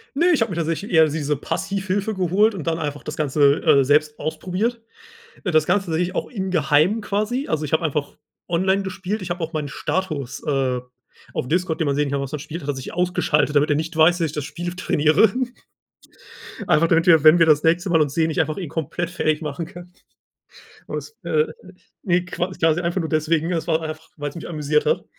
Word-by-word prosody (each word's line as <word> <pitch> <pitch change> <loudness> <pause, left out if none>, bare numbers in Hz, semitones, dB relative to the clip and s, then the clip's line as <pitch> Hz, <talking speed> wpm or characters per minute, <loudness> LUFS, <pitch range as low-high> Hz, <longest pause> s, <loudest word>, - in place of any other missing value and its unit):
Ne, 340 +5 +3
ich 300 - +2
habe 225 -2 +1
mir 170 - -4
tatsächlich 165 +4 -2
eher 160 -2 +6
diese 150 -1 -1
Passivhilfe 195 +7 -2
geholt 195 +3 +2
und 170 -5 -7
dann 165 0 +1
einfach 145 -2 -4
das 150 - -6
Ganze, 145 0 +2
äh, 145 -4 +5
selbst 150 +2 +2
ausprobiert. 190 +9 -2 0.6
Äh, 180 - -1
das 155 -1 +3
Ganze 190 +1 +1
tatsächlich 175 +3 -1
auch - - -2
in 190 -5 -4
geheim 160 +6 +3
quasi. 215 +7 -2
Also, 155 -1 -1
ich 145 - -6
habe 160 - +2
einfach 150 -2 -2 0.3
online 190 +3 +1
gespielt. 190 +2 -4
Ich 185 - -6
habe 175 -1 -3
auch 165 - -4
meinen 155 -3 -3
Status, 140 -6 -3
äh, 135 -3 +1 0.5
auf - - -3
Discord, 175 -1 0
den - - +2
man 140 - +1
sehen 145 -1 +1
kann, 140 0 -1
was 140 +1 -5
man 150 - -4
spielt, 160 +4 -7
hat 145 - -6
er 145 - 0
sich 130 - -7
ausgeschaltet, 155 -4 +1
damit 145 +2 +3
er 145 - +3
nicht 160 +2 -3
weiß, 175 +3 +5
dass 165 - +1
ich - - -6
das 150 -2 -4
Spiel 175 +4 -5
trainiere. 160 +3 +3 1.4
Einfach 165 +2 +3
damit 165 +1 +3
wir, 160 -3 +6
wenn 155 +3 +8
wir 165 - +5
das 150 -1 +4
nächste 170 +4 +2
Mal 165 - +4
uns 145 -2 -2
sehen, 160 -1 +1
ich - - -1
einfach 155 - -1
ihn 180 -6 -5
komplett 160 +2 -3
fertig 155 -3 0
machen 150 +1 -4
kann. 175 +2 -12 0.9
Und - - -4
es, 450 - -9
äh 460 0 +2 0.6
ne, 180 -3 +1
qua 180 +1 -3
quasi 165 -1 +1
einfach 175 +2 -1
nur 160 - -3
deswegen, 160 +1 +1
es 165 - -2
war 160 -1 +1
einfach, 155 0 -7
weil's 145 +1 -5
mich 170 - -7
amüsiert 150 -1 0
hat. - - +1
165 Hz, 220 wpm, -22 LUFS, 150-180 Hz, 1.4 s, wenn